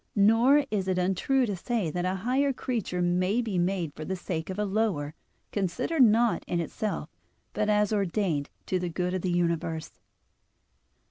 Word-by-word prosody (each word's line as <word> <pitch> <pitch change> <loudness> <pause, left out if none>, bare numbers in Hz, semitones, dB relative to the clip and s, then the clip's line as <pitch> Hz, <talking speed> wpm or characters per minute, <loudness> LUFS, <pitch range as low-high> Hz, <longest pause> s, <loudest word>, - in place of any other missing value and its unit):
Nor 230 +8 +5
is 195 -3 -1
it 185 -1 +1
untrue 195 +9 +2
to 205 -4 -2
say 195 -2 -2
that 175 +2 -2
a 185 +1 0
higher 275 +3 +2
creature 225 -9 -2
may 185 +5 +1
be 215 -7 -1
made 175 -4 -1
for 155 - -7
the 190 +5 -3
sake 170 -2 -4
of 190 - -4
a 210 - 0
lower, 195 -8 0 0.4
considered 205 - 0
not 230 0 +4
in 175 - -1
itself, 170 +1 -3 0.5
but 210 0 0
as 210 0 +2
ordained 190 -7 0 0.2
to 185 - 0
the 180 -1 -2
good 180 +2 -2
of 185 - -1
the 185 - -1
universe. 170 -2 -1
190 Hz, 175 wpm, -28 LUFS, 175-220 Hz, 0.5 s, Nor